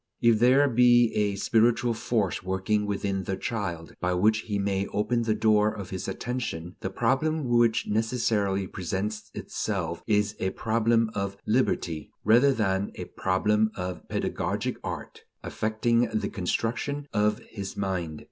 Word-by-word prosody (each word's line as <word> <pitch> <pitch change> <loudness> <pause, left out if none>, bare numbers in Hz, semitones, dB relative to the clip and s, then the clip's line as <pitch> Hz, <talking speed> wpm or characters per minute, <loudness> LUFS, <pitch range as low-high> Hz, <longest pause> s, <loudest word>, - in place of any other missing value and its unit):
If 115 -2 +4
there 130 +4 +5
be 120 -2 +5
a 105 -1 +1
spiritual 115 +3 +2
force 110 -4 -1
working 95 +3 0
within 100 -2 -2
the 95 +1 -2
child, 85 -8 -4
by 90 0 +1
which 110 +4 +3
he 105 -2 -3
may 100 0 0
open 115 +3 0
the 110 -2 +1
door 105 -1 +3
of 100 -3 -8
his 95 -2 -4
attention, 105 -9 -4
the 95 - -3
problem 135 +10 0
which 120 -2 +3
necessarily 105 -3 0
presents 95 +4 -4
itself - - -3
is 105 0 +1
a 95 - 0
problem 115 0 +2
of 100 -1 -3
liberty, 105 -9 0
rather 120 +6 +5
than 100 -5 0
a - - -6
problem 105 +3 +2
of 90 -1 -5
pedagogic - - -2
art - - -6 0.2
effecting 115 +2 +1
the 110 - -1
construction 120 +9 -2
of 105 0 +2
his 100 -3 -6
mind. 90 -6 -2
105 Hz, 145 wpm, -27 LUFS, 95-115 Hz, 0.2 s, there